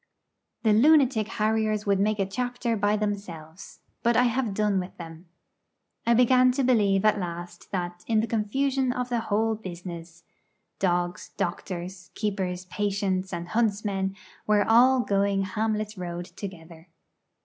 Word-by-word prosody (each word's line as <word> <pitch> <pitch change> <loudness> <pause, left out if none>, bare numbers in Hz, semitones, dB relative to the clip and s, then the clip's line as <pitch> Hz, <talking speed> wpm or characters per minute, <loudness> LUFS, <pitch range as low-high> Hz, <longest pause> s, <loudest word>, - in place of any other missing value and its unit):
The 220 -2 +4
lunatic 260 -3 +4
harriers 215 -1 0
would 200 -1 +2
make 210 +1 +1
a 195 - +1
chapter 245 +3 -2
by 205 0 +1
themselves; 195 -5 -6 0.2
but 235 -1 +2
I 245 - +5
have 240 -4 0
done 210 -2 +1
with 180 0 -7
them. 165 0 -10 0.8
I 235 - +5
began 255 +1 +5
to 270 +1 0
believe 210 -6 +3
at 215 -1 +4
last 175 -1 -7
that, 175 -2 -4
in 225 -2 +3
the 220 - +1
confusion 260 +4 0
of 250 0 -3
the 240 -1 0
whole 225 0 0
business, 175 -4 -8 0.6
dogs, 175 -1 -1
doctors, 175 +1 -4
keepers, 190 -4 -2
patients, 195 -1 -1
and 170 -1 -5
huntsmen 200 -3 0 0.3
were 210 -1 +3
all 250 +3 +6
going 200 -2 +1
Hamlet's 215 +1 -2
road 175 -1 -5
together. 170 -3 -10
205 Hz, 140 wpm, -26 LUFS, 180-225 Hz, 0.8 s, all